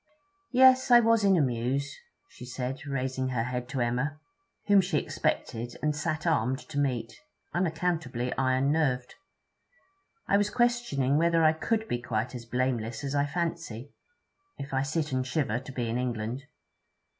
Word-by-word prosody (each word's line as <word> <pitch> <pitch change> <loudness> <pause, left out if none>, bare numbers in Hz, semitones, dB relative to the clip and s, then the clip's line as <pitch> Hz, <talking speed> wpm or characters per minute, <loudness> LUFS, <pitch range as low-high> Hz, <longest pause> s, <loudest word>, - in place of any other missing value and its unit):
'Yes, 260 0 +6
I 240 -1 +9
was 230 -2 +3
in 195 -2 +5
a - - +4
muse,' 130 +3 -1 0.3
she - - -13
said, 125 +2 -5
raising 130 -1 -2
her 125 -3 -1
head 125 0 -4
to 130 -1 -2
Emma, 125 +6 -1 0.5
whom 200 -1 +6
she 180 -4 -1
expected 120 -3 -2
and 150 -1 +1
sat 155 +2 -2
armed 130 -6 +1
to 145 -2 -2
meet, 125 -5 -1 0.4
unaccountably 160 -8 -1
iron 130 +1 +2
nerved. 130 -5 0 1.1
'I 200 - +4
was 205 0 +1
questioning 240 - +1
whether 165 0 +3
I 155 0 +5
could 220 +7 -1
be 120 - -2
quite 120 0 -2
as 120 -2 -7
blameless 120 -1 -2
as 140 0 -3
I 145 0 +1
fancy, 160 -6 -4 0.6
if 140 0 -7
I 135 - +2
sit 150 +2 -2
and 130 0 0
shiver 130 -3 -1
to 135 +1 -10
be 125 -3 -3
in 115 +2 -1
England. 120 +1 -3
135 Hz, 160 wpm, -28 LUFS, 125-160 Hz, 1.1 s, I